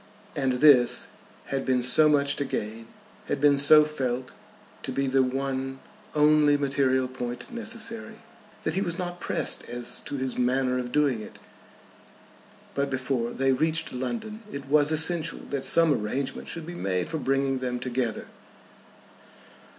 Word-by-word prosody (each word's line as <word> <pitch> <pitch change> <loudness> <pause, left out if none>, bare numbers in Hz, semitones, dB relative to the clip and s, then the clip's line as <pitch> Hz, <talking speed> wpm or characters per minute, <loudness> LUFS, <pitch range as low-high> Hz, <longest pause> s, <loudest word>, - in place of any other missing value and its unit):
And 135 -2 0
this 125 -2 +5 0.5
had 135 -1 -1
been 130 -2 +1
so 150 +5 +5
much 140 -1 +2
to 145 - 0
gain, 110 -3 -5 0.4
had 145 - -1
been 145 0 +5
so 150 +2 +7
felt 130 -4 -3 0.5
to - - -5
be 140 - -1
the 135 0 +2
one 135 0 -2 0.4
only 150 -1 +4
material 135 -2 +1
point 125 - -7
necessary, 230 -1 -3 0.5
that 160 - 0
he 190 - 0
was 170 -3 -2
not 175 -1 -5
pressed - - -2
as 120 0 -3
to - - -5
his 130 -1 -3
manner 125 +1 +1
of 125 -1 -5
doing 140 -6 +1
it. - - -11 1.4
But 140 0 -1
before 130 -3 -1
they 135 +2 0
reached 160 +5 0
London 215 - -4
it 140 -1 -6
was 145 +2 +3
essential 160 +1 +1
that 140 -2 -2
some 165 -2 +6
arrangement 130 +4 -3
should 165 -2 -6
be 175 - -7
made 95 - -2
for 160 - -3
bringing 135 -1 0
them 125 -1 -3
together. 120 -2 -2
135 Hz, 150 wpm, -26 LUFS, 130-155 Hz, 1.4 s, so